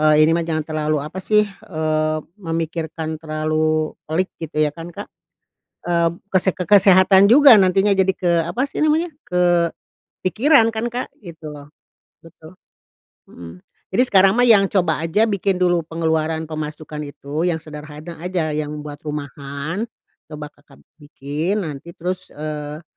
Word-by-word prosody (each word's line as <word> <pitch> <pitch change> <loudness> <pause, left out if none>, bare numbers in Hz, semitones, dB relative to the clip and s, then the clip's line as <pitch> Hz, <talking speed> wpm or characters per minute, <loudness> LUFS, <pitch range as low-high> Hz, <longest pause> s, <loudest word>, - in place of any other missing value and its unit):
eee, 155 0 +4
ini 165 - +3
mah 170 - +1
jangan 155 -2 -2
terlalu, 155 -1 -1
apa 155 +6 -6
sih, 210 +2 +3
eee, 155 -5 -2 0.2
memikirkan 160 -1 -4
terlalu 155 0 -1
pelik, 160 +4 -1 0.2
gitu 155 -1 -5
ya 150 -1 +1
kan, 165 +1 -8
Kak? 170 - -8 0.8
Mmm, 170 0 0
kese 190 -1 +2
ke - - -7
kesehatan 190 -1 +6
juga 255 +2 +8
nantinya 195 +1 +3
jadi 190 0 +3
ke 170 -3 +1
apa 245 +12 -2
sih - - -10
namanya, 320 +3 +2 0.9
kepikiran 230 +4 +2
kan, 225 +2 -2
Kak, 245 +2 -5
gitu 160 -6 -10
loh. 145 -1 -11 0.6
Betul. 165 +1 -15 0.8
Mhm. 85 +1 -12 0.3
Jadi 250 - +5
sekarang 195 -5 +4
mah 245 - +3
yang 210 -5 +5
coba 175 -6 +1
aja 165 +7 +1
bikin 200 -3 0
dulu 180 -1 +2
pengeluaran 160 -1 -1
pemasukan 155 -1 -6
itu, 145 +4 -3
yang 165 -2 -2
sederhana 155 +2 -9
aja 175 -2 -2
yang 150 0 -4
buat 145 -1 -8
rumahan. 150 - -5 0.4
Coba 150 -1 -8
Kakak 145 -1 -22 0.2
bikin, 150 +7 -3
nanti 160 +2 -8
terus, 185 +2 -3
eee, 150 +1 -6
165 Hz, 145 wpm, -20 LUFS, 155-190 Hz, 0.9 s, juga